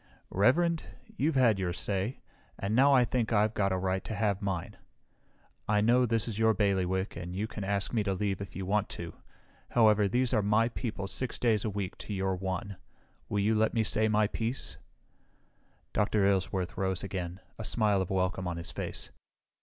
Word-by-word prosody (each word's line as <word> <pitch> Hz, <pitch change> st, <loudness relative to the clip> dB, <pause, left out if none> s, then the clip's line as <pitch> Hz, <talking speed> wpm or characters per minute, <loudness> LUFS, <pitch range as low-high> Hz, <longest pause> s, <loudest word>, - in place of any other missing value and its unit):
"Reverend, 160 Hz, -, +3 dB, 0.3 s
you've 160 Hz, -5 st, +1 dB
had 115 Hz, -6 st, +4 dB
your 90 Hz, -2 st, -1 dB
say, 100 Hz, +6 st, -2 dB, 0.4 s
and 100 Hz, +3 st, -1 dB
now 135 Hz, +3 st, +6 dB
I 130 Hz, -3 st, +5 dB
think 120 Hz, -1 st, -1 dB
I've 105 Hz, 0 st, +3 dB
got 100 Hz, -2 st, +1 dB
a 95 Hz, -, +1 dB
right 95 Hz, 0 st, -1 dB
to 110 Hz, -, -4 dB
have 100 Hz, -2 st, 0 dB
mine. 95 Hz, -4 st, -3 dB, 0.9 s
I 105 Hz, 0 st, +3 dB
know 120 Hz, +4 st, +4 dB
this 115 Hz, -1 st, 0 dB
is 110 Hz, -2 st, -4 dB
your 110 Hz, -1 st, +4 dB
bailiwick 95 Hz, -2 st, 0 dB
and 90 Hz, 0 st, -6 dB
you 100 Hz, +3 st, -1 dB
can 110 Hz, -2 st, -6 dB
ask 100 Hz, +2 st, -1 dB
me 110 Hz, -3 st, +2 dB
to 95 Hz, -2 st, 0 dB
leave 100 Hz, 0 st, -1 dB
if 100 Hz, -2 st, -8 dB
you 95 Hz, -, -4 dB
want 105 Hz, +2 st, +1 dB
to. 85 Hz, -1 st, -6 dB, 0.6 s
However, 110 Hz, -3 st, +4 dB
these 125 Hz, +5 st, +1 dB
are 110 Hz, -, +3 dB
my 105 Hz, +3 st, +3 dB
people 110 Hz, -5 st, -4 dB
six 130 Hz, +5 st, -2 dB
days 110 Hz, -4 st, +2 dB
a 110 Hz, -, -1 dB
week 100 Hz, -2 st, -4 dB
to 105 Hz, -, -5 dB
your 95 Hz, 0 st, 0 dB
one. 95 Hz, +1 st, -4 dB, 0.5 s
Will 105 Hz, -, 0 dB
you 105 Hz, +3 st, +2 dB
let 110 Hz, +1 st, +2 dB
me 115 Hz, -, +3 dB
say 110 Hz, +1 st, +1 dB
my 110 Hz, 0 st, +3 dB
piece?" 115 Hz, +4 st, -3 dB, 1.2 s
Dr. 105 Hz, -1 st, +2 dB
Aylesworth 95 Hz, -2 st, 0 dB
rose 95 Hz, -1 st, 0 dB
again, 90 Hz, -2 st, -4 dB, 0.2 s
a -, -, -4 dB
smile 105 Hz, -3 st, +2 dB
of 95 Hz, -, -3 dB
welcome 95 Hz, -1 st, 0 dB
on 85 Hz, -1 st, -3 dB
his 85 Hz, 0 st, -5 dB
face. -, -, -5 dB
105 Hz, 195 wpm, -30 LUFS, 95-110 Hz, 1.2 s, now